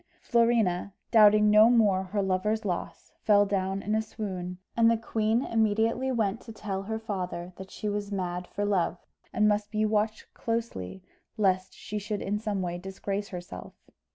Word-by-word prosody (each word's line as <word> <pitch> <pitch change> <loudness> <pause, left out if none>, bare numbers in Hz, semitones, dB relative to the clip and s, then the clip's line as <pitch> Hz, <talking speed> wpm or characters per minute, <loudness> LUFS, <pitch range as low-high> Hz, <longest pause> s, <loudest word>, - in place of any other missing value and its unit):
Florina, 225 -6 +1 0.2
doubting 210 -1 +6
no 215 +2 +7
more 210 -6 +4
her 200 +2 -1
lover's 210 +4 0
loss, 180 -3 -4
fell 205 -1 +5
down 195 -1 -1
in 210 - -1
a 220 - +2
swoon, 185 -5 -5 0.2
and 230 -1 +5
the 230 - +3
queen 225 +1 0
immediately 225 +3 +1
went 225 -2 0
to 230 - -10
tell 205 -3 -4
her 220 +3 -3
father 185 -5 -5
that 190 0 -9
she 210 - -5
was 205 0 -3
mad 180 -2 -3
for 205 - -3
love, 185 -3 +1 0.3
and 210 - +3
must 210 0 +1
be 215 0 0
watched 215 0 -1
closely 225 - -4 0.3
lest 190 -2 +1
she 210 - -5
should 210 0 -3
in 205 +2 -1
some 205 -3 -2
way 175 0 -3
disgrace 195 +2 -4
herself. 180 -2 -8
205 Hz, 170 wpm, -28 LUFS, 190-220 Hz, 0.3 s, no